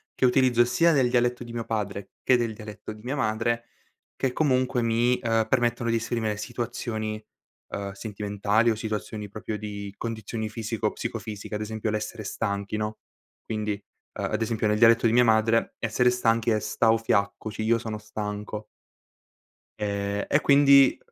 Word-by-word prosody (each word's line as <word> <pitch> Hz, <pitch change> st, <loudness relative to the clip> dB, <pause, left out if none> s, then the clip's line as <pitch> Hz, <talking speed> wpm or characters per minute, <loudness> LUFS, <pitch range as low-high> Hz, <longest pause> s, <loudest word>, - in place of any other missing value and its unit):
che -, -, -3 dB
utilizzo 125 Hz, -2 st, +4 dB
sia 165 Hz, +7 st, +3 dB
del 130 Hz, -4 st, +3 dB
dialetto 120 Hz, 0 st, +1 dB
di 120 Hz, -, -9 dB
mio 115 Hz, -1 st, -4 dB
padre 100 Hz, -3 st, -3 dB
che 125 Hz, -, +5 dB
del 115 Hz, -2 st, -1 dB
dialetto 105 Hz, 0 st, -8 dB
di 105 Hz, -, -14 dB
mia 130 Hz, +4 st, -3 dB
madre, 115 Hz, 0 st, 0 dB, 0.5 s
che 130 Hz, -, 0 dB
comunque 130 Hz, -3 st, +1 dB
mi, 120 Hz, +2 st, +2 dB
uhm, 115 Hz, -1 st, +1 dB
permettono 120 Hz, -1 st, +1 dB
di 115 Hz, -, +2 dB
esprimere 110 Hz, -2 st, -2 dB
situazioni, 115 Hz, -2 st, -4 dB, 0.5 s
ehm, 100 Hz, 0 st, -4 dB
sentimentali 105 Hz, +2 st, 0 dB
o 110 Hz, -, +2 dB
situazioni 110 Hz, -1 st, -4 dB
proprio 105 Hz, +1 st, -5 dB
di 100 Hz, -1 st, -6 dB
condizioni 110 Hz, -1 st, -4 dB
fisico-psicofisiche, 110 Hz, -1 st, -4 dB
ad 105 Hz, -, -3 dB
esempio 110 Hz, 0 st, -3 dB
l'essere 105 Hz, 0 st, -3 dB
stanchi, 100 Hz, 0 st, -2 dB
no? 105 Hz, 0 st, -3 dB, 0.4 s
Quindi, 105 Hz, -1 st, -2 dB, 0.4 s
uhm, -, -, -3 dB
ad 110 Hz, -, -2 dB
esempio 110 Hz, -1 st, 0 dB
nel 105 Hz, -, +2 dB
dialetto 115 Hz, +1 st, +6 dB
di 115 Hz, -, +2 dB
mia 125 Hz, +1 st, +6 dB
madre 110 Hz, 0 st, +3 dB
essere 115 Hz, +2 st, +2 dB
stanchi 115 Hz, -1 st, +2 dB
è 110 Hz, -, +2 dB
"stau 115 Hz, +1 st, +2 dB
fiacco", 100 Hz, 0 st, 0 dB
cioè 110 Hz, 0 st, -4 dB
io 115 Hz, +1 st, +4 dB
sono 110 Hz, -2 st, -4 dB
stanco. 105 Hz, 0 st, -5 dB, 1.1 s
Ehm, 100 Hz, -1 st, -2 dB
e 145 Hz, -, +3 dB
quindi 140 Hz, -1 st, +6 dB
110 Hz, 160 wpm, -26 LUFS, 105-120 Hz, 1.1 s, dialetto